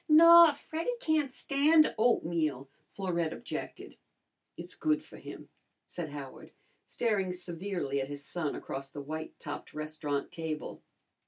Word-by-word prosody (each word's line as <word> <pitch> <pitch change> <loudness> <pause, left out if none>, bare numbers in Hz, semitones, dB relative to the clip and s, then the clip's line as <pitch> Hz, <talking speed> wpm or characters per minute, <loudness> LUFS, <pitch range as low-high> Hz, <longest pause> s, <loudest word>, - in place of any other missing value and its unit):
"Naw, 335 +1 +9
Freddy 325 +11 -3
can't 310 - +1
stand 300 +4 +3
oatmeal," 165 - +1 0.2
Florette 170 -4 -2
objected. - - -7 0.6
"It's - - -8
good 310 -1 0
for - - -13
him," - - -10 0.4
said 170 -3 -6
Howard, 145 -2 -9 0.3
staring 205 -6 0
severely 175 -5 -3
at 135 - -3
his 145 -1 -7
son 160 -4 -3
across 135 0 -6
the 145 - -8
white 155 +3 -6
topped 145 - -7
restaurant 150 -2 -3
table. 160 -2 -5
170 Hz, 130 wpm, -31 LUFS, -, 0.6 s, Naw